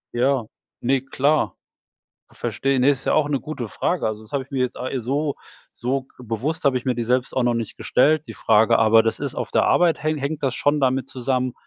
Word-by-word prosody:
Ja, 130 0 +2 0.4
ne 130 +2 +1
klar. 140 +3 0 0.7
Verstehe. 135 -1 -1
Ne, 130 - +4
ist 140 -3 +1
ja - - +1
auch 155 -2 +2
'ne 145 -2 0
gute 130 -5 -6
Frage. 175 - -1
Also, 110 0 -3
das 110 - -17
hab 140 - 0
ich 130 - -17
mir 135 - -3
jetzt, 125 0 -1
a 125 - -3
äh 135 - -2
so 140 +4 -1 0.4
so 130 +2 -2
bewusst 125 - -3
hab 140 -2 +4
ich 125 - -2
mir 130 - +2
die 120 0 -2
selbst 125 +2 0
auch 130 - +3
noch 120 0 +2
nicht 115 -2 -4
gestellt, 150 +4 +2
die - - -6
Frage, 115 +1 +3
aber 110 0 +6
das 115 - -1
ist - - -4
auf - - -4
der - - +3
Arbeit 170 -3 +3
häng 155 0 0
hängt 145 +2 -3
das 135 -3 0
schon 145 +1 +1
damit 130 -1 +1
zusammen, 130 -1 -1
130 Hz, 230 wpm, -22 LUFS, 120-140 Hz, 0.7 s, aber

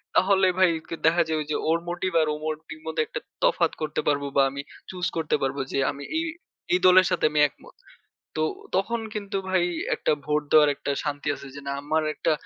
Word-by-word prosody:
তাহলে 190 0 +4
ভাই 185 -2 +5 0.2
কে - - -4
দেখা 170 +1 +5
যায় 155 -1 0
যে - - +1
ওর 165 - +3
মোটিভ 180 +2 -2
আর 155 - +1
ও - - -3
মোটিভ 155 0 -5
মধ্যে 160 -1 -1
একটা - - -5 0.2
তফাৎ - - +3
করতে 155 0 -1
পারবো 140 -1 +1
বা 140 - +6
আমি 140 +1 -5 0.3
চুজ 180 -1 -3
করতে 160 -2 +1
পারব 135 +1 -1
যে - - 0
আমি 145 - -9
এই 325 - +1 0.5
এই 180 - +4
দলের 185 0 +8
সাথে - - +1
আমি 150 - +1
একমত। - - -18 0.6
তো 155 - +1 0.3
তখন 230 +5 0
কিন্তু 200 -1 -3
ভাই 185 -2 +2 0.3
একটা - - +1
ভোট 150 0 +1
দেওয়ার 150 -1 +7
একটা - - -4
শান্তি 145 -1 -3
আছে 140 - -10
যে 140 - -7
না 140 - -2
আমার 155 +2 +1
একটা 165 - +1
160 Hz, 205 wpm, -25 LUFS, 150-185 Hz, 0.6 s, দলের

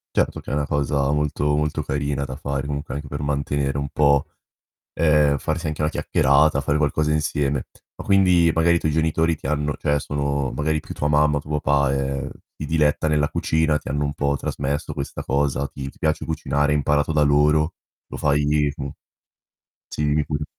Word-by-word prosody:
Certo - - +1
che - - -10
è - - -1
una 75 0 0
cosa 70 -1 0
molto 75 0 0
molto 75 0 -1
carina 70 0 -2
da 65 -1 -6
fare 70 0 -3
comunque 70 0 -4
anche 75 0 -6
per 70 +1 -5
mantenere 70 -1 -1
un 70 0 -3
po' 70 -2 +3 0.7
eh, 75 -3 +3
farsi 80 +3 -2
anche 75 0 -4
una 75 0 +1
chiacchierata, 70 +1 +3
fare 75 +1 0
qualcosa 75 0 +1
insieme. 75 -3 -1 0.3
Ma - - -9
quindi 90 -4 +4
magari 85 +1 +3
i - - +3
tuoi 80 - 0
genitori 80 +1 +1
ti - - -8
hanno 75 0 -1
cioè, 75 0 0
sono 70 -1 -2
magari 75 +1 -1
più - - -9
tua 75 - -2
mamma 75 0 +3
o - - 0
tuo 75 0 -3
papà, 70 -1 +2
ehm, 70 0 -2 0.3
si 75 - -5
diletta 75 0 +1
nella 75 -1 +2
cucina, 80 -1 +1
ti - - -10
hanno 75 +2 -1
un 70 - -1
po' 70 -2 0
trasmesso 70 +2 -3
questa 70 -2 -5
cosa. 70 0 0
Ti 70 -1 -7
ti - - -14
piace 80 0 0
cucinare, 75 -2 0
hai 75 - +2
imparato 75 +2 +1
da 75 -1 +3
loro, 75 +2 +3 0.3
lo - - -7
fai 75 0 +1 0.3
mh 70 -1 -5 1.0
Sì, 75 - -4
dimmi 75 0 +1
pure. 75 0 -3
75 Hz, 195 wpm, -22 LUFS, 70-75 Hz, 1.0 s, quindi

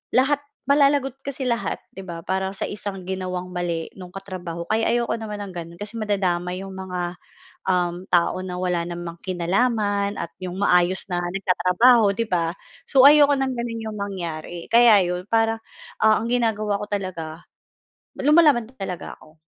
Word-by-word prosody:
lahat 270 +3 +4 0.3
malalagot 280 -2 +3
kasi 270 -1 -3
lahat, 235 -1 -1 0.2
'di 195 - -7
ba, 170 -1 -6
para 190 0 -1
sa 195 - -3
isang 200 -2 -5
ginawang 185 -1 -4
mali 170 -2 -2
nung 180 -2 -10
katrabaho. 180 -3 -6
Kaya 225 +1 +1
ayoko 235 0 +1
naman 215 -2 -6
ng 195 - -8
gano'n 170 0 -8
kasi 210 +2 -6
madadamay 185 -4 -1
'yong 195 -1 -8
mga, 180 -2 -4 0.5
um, 180 -2 +1
tao 175 0 +2
na 180 -1 -5
wala 180 -2 0
namang 175 -1 -6
kinalaman 200 +2 0
at 170 -3 -5
yung 180 -1 -5
maayos 180 -1 +3
na 175 - 0
nagtatrabaho, 195 +4 +3
'di 230 - -1
ba? 170 -1 0 0.3
So, 265 -2 +5
ayoko 290 -1 +7
ng 270 -1 -1
ganun 230 -1 -4
yung 210 - -7
mangyari. 175 -4 -5
Kaya 230 -4 +7
'yon 180 +1 -3
parang, 225 0 +2 0.4
ah, 220 0 +6
ang 230 - -3
ginagawa 215 -4 +1
ko - - -3
talaga, 175 -5 -4 0.8
lumalaban 295 -5 +5
talaga 190 -6 -6
ako. 155 +1 -20
195 Hz, 160 wpm, -23 LUFS, 180-225 Hz, 0.8 s, ayoko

